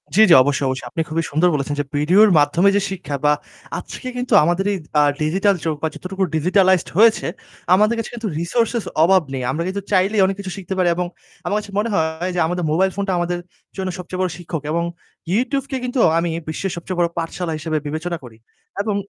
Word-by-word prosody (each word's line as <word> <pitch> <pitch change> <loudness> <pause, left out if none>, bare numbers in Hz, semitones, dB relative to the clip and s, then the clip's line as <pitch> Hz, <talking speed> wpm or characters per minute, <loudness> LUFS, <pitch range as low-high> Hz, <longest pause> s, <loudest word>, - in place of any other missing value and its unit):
জি, - - +3
জি - - +8
অবশ্যই, 140 0 0
অবশ্যই। 130 -2 -4
আপনি 165 - -2
খুবই 165 +1 0
সুন্দর 155 +5 +3
বলেছেন 145 0 -1
যে - - +1
ভিডিওর 180 +9 +5
মাধ্যমে 165 +7 +4
যে 205 - +3
শিক্ষা 180 -7 -4
বা 150 - +5 0.5
আজকে 255 - -8
কিন্তু 250 -1 -2
আমাদের 175 +4 +1
এই - - -1 0.2
আ - - +6 0.2
ডিজিটাল 195 +6 +2
যুগ 160 -1 -1
বা 160 - +3
যতটুকু 190 +1 -4
ডিজিটালাইজড 185 +3 +3
হয়েছে, 225 +1 +5 0.5
আমাদের 215 +4 +3
কাছে 230 - -3
কিন্তু 225 -2 -3
রিসোর্সেস 230 +6 0 0.2
অভাব 190 +2 +5
নেই। 130 -1 -3
আমরা 165 - -2
কিন্তু 200 +2 -3
চাইলেই 195 +2 +3
অনেক 195 +1 0
কিছু 190 -2 -5
শিখতে 195 0 -5
পারি 185 -1 +2
এবং 180 +1 -1 0.4
আমার 205 - 0
কাছে 205 - -10
মনে 220 +2 0
হয় 160 +2 -1
যে - - 0
আমাদের 180 +1 -2
মোবাইল 190 +4 +2
ফোনটা 200 -1 -1
আমাদের 175 0 -1 0.4
জন্য 190 -1 -2
সবচেয়ে 180 +1 -6
বড় 185 - +1
শিক্ষক 170 -3 -5
এবং 170 +1 0 0.5
YouTube 265 +5 0
কে 265 - -1
কিন্তু 250 +1 -2 0.2
আমি 170 +1 0 0.2
বিশ্বের 190 +4 -3
সবচে 170 +2 -5
বড় 170 - +4
পাঠশালা 165 0 -3
হিসেবে 155 0 -2
বিবেচনা 165 +3 -3
করি। 115 -3 -12 0.5
এবং 210 -1 -1
180 Hz, 205 wpm, -20 LUFS, 160-200 Hz, 0.5 s, জি